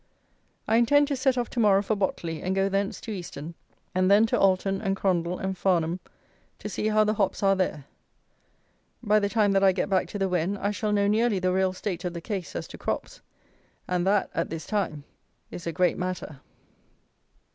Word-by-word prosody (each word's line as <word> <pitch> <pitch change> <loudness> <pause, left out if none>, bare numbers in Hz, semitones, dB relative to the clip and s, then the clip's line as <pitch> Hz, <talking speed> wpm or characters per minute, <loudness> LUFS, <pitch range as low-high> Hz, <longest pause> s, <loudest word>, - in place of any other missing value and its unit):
I 225 - +3
intend 285 +5 +4
to 285 - 0
set 260 0 +1
off 240 -1 0
to 245 - -3
morrow 200 -3 +4
for 215 +2 0
Botley, 170 -5 -2
and 185 +1 -1
go 195 0 +2
thence 195 +2 -1
to 225 - -6
Easton; 170 -5 -7 0.4
and 185 0 +2
then 205 +3 +6
to 225 - 0
Alton 195 0 +2
and 195 -2 0
Crondall 180 -2 0
and 190 0 -3
Farnham, 175 -1 +1 0.6
to - - -7
see 210 +1 -2
how 215 0 +4
the 215 0 +1
hops 200 -1 -1
are 195 0 +4
there. 180 -7 -2 1.2
By 215 -1 +4
the 200 -1 0
time 210 -2 +2
that 195 0 +3
I 195 - +6
get 195 +2 -2
back 185 -2 +2
to 205 - -6
the 195 -1 0
Wen 180 +2 0
I 200 +1 -1
shall 210 0 -2
know 205 -1 +2
nearly 220 0 +2
the 185 0 0
real 190 0 +2
state 185 -1 -4
of 175 -1 -3
the - - -3
case 185 -2 -5
as - - -4
to - - -10
crops; - - -4 0.7
and 180 0 0
that, 200 0 +2
at 165 - -1
this 165 -1 -6
time, 195 -9 -2 0.5
is 170 - -7
a - - 0
great 180 0 +1
matter. 180 -6 -4
195 Hz, 210 wpm, -26 LUFS, 180-210 Hz, 1.2 s, then